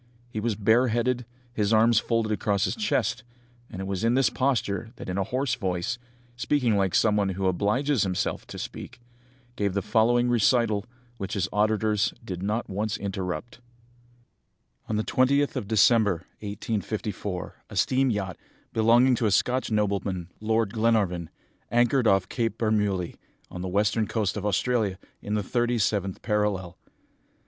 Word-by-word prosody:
He 110 - -3
was 110 0 -1
bareheaded, 120 +3 +2 0.3
his 105 -2 0
arms 115 0 +5
folded 115 -1 0
across 100 -1 0
his - - 0
chest, 210 - 0 0.5
and 95 - -8
it 95 - -3
was 95 0 -3
in 115 +2 +3
this 135 0 +3
posture 115 -5 0
that - - -9
in 90 - -2
a - - +2
hoarse 130 +5 -1
voice, 95 +2 -2 0.4
speaking 125 -2 +1
like 95 -2 +1
some 105 -2 +4
one 100 -2 +1
who 95 +1 -2
obliges 105 +8 +1
himself 95 -2 -1
to - - -8
speak, - - -7 0.5
he - - -32
gave 100 -2 0
the 100 - 0
following 120 +2 +3
recital, 115 -3 +2 0.3
which 100 +2 -4
his 95 -2 0
auditors 105 0 +1
did 90 -4 -5
not 105 +3 -1
once 105 +2 -2
interrupt 95 +2 -4 1.3
"On 110 - 0
the 110 - 0
20th 140 +5 +2
of 120 -7 -3
December, 105 -4 +3
1854, 105 -2 -4
a - - -9
steam 130 +1 +2
yacht, 95 -5 -2 0.4
belonging 120 +4 +5
to 120 -2 +1
a - - +1
Scotch 125 +5 +1
nobleman, 100 -4 -1
Lord 110 -1 0
Glenarvan, 105 -7 +1 0.4
anchored 120 +1 +3
off 95 -2 +3
Cape 115 -3 -2
Bermouilli, 105 -6 0 0.3
on 90 - -6
the 95 - -3
western 105 +3 +1
coast 105 -4 -1
of 105 -1 -2
Australia, 105 -1 +1 0.2
in 105 - -3
the 105 - 0
thirty 120 +3 0
seventh 100 -3 -1
parallel. 105 -5 -1
110 Hz, 155 wpm, -26 LUFS, 100-120 Hz, 1.3 s, arms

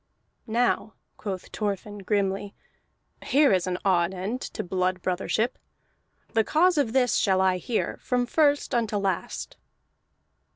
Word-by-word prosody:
"Now," 230 -1 0 0.2
quoth 190 -4 -6
Thorfinn 205 0 -3
grimly, 200 0 -1 0.7
"here 280 -3 +4
is 185 -1 +1
an 180 -1 -1
odd 180 -1 +2
end 205 +8 -3
to - - -5
blood 185 0 -1
brothership. 195 +6 -1 0.7
The 225 -1 +4
cause 340 +6 +3
of 240 -6 0
this 250 -3 +3
shall 190 -2 +3
I 190 -1 +3
hear, 220 +6 -2
from 250 -1 0
first 290 +1 +2
unto 225 -3 +1
last." 195 -3 -3
205 Hz, 130 wpm, -26 LUFS, 190-245 Hz, 0.7 s, here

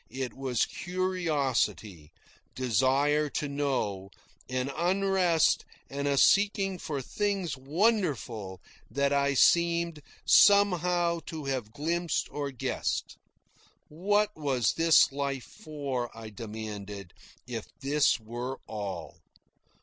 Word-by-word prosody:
It 130 -1 -4
was 130 -4 0
curiosity, 150 - -2 0.4
desire 135 +5 +2
to 150 - -1
know, 130 -9 -2 0.4
an 130 +1 -2
unrest 185 -2 +2 0.3
and 140 +1 -2
a 140 -1 +1
seeking 195 +1 +3
for 145 -5 -4
things 195 -2 -2
wonderful 135 - -1 0.3
that 140 0 +1
I 140 0 +2
seemed 170 +1 +3 0.2
somehow 180 -4 +4
to 155 -3 -6
have 130 -6 -3
glimpsed 165 +6 -1
or 145 -1 -3
guessed. 130 -4 -3 0.7
What 205 +6 +1
was 130 -8 0
this 165 -2 +5
life 140 -2 -3
for, 140 -6 -5
I 110 -1 -8
demanded, 105 -3 -7 0.3
if 120 -3 -6
this 145 -1 +2
were 120 +4 -5
all? 100 -3 -6
140 Hz, 105 wpm, -29 LUFS, 125-170 Hz, 0.7 s, this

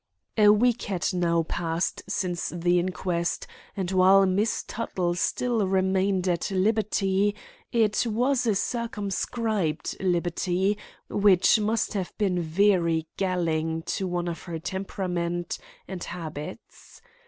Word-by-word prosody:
A 210 -1 +6
week 235 +3 +4
had 190 -2 -2
now 170 -2 +2
passed 165 +1 -2
since 180 -3 -2
the 175 +1 +1
inquest, 180 - -2 0.3
and, 185 -2 -2
while 190 +1 +6
Miss 200 +4 +1
Tuttle 180 -6 -2
still 225 +4 0
remained 190 0 +1
at 175 +1 0
liberty, 200 0 +1 0.4
it 225 -1 +2
was 245 +3 +1
a 215 - +3
circumscribed 210 -5 -2
liberty 180 +2 0 0.3
which 200 +1 +4
must 215 +1 0
have 190 -4 -4
been 185 -4 +1
very 170 -1 +2
galling 165 -4 0
to 190 - -2
one 175 -1 -2
of 170 -1 -4
her 170 -2 -4
temperament 175 -1 -3 0.3
and 185 -2 -6
habits. 155 -4 -8
185 Hz, 120 wpm, -26 LUFS, 175-205 Hz, 0.4 s, A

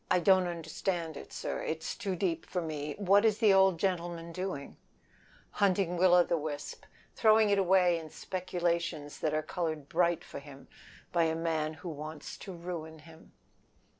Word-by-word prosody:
"Don't 190 -2 +5
understand 165 0 -3
it, - - -10
it 160 0 -3
is - - -3
too 195 -2 -3
deep 170 -3 -1
for 180 - -2
me. 150 -3 -4
What 200 +1 +4
is 215 -2 +3
the 215 -4 +5
old 190 -3 +5
gentleman 170 -3 -2
doing?" 180 -5 -5 0.8
"Hunting 190 -3 +1
Will 180 0 +5
o' 175 - +7
the 170 -1 0
wisp. 150 -1 -6 0.3
Throwing 220 -1 +5
it 200 - +3
away 180 -2 +4
in 160 -1 -9
speculations 170 -4 -2
that 155 -1 0
are 155 - 0
colored 155 -5 -3
bright 175 +1 +1
for - - -8
him 140 -1 -13 0.4
by 170 -1 +3
a 160 0 0
man 160 -2 -1
that 160 - -15
wants 155 -1 -6
to 195 - -8
ruin 170 -2 -6
him." 160 +1 -16
170 Hz, 165 wpm, -31 LUFS, 160-185 Hz, 0.8 s, o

